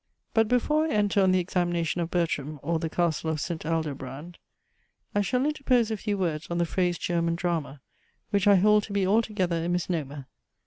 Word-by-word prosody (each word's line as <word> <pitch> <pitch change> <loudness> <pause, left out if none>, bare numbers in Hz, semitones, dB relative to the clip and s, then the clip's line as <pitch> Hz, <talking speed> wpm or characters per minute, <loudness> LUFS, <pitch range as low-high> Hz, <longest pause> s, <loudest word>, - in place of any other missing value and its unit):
But 225 -1 +3
before 300 +7 +2
I 310 - -1
enter 205 -1 +2
on 190 -1 +4
the 185 - +3
examination 175 -1 0
of 170 - -2
BERTRAM, 155 -4 -1
or 165 -1 0
THE 165 0 -3
CASTLE 165 -2 0
OF 155 -1 -1
ST. 160 0 -4
ALDOBRAND, 150 0 -4 0.7
I 205 - +2
shall 250 +6 0
interpose 260 -6 +1
a 220 - -1
few 205 0 -2
words, 165 -5 -2
on 170 - -2
the 170 - +2
phrase 175 0 0
German 170 -1 0
Drama, 165 -5 -3 0.5
which 200 -1 +2
I 200 - +7
hold 210 +3 +5
to 205 - -8
be 200 -2 +1
altogether 190 -5 +1
a 170 - -2
misnomer. 155 -6 -2
175 Hz, 190 wpm, -27 LUFS, 165-205 Hz, 0.7 s, I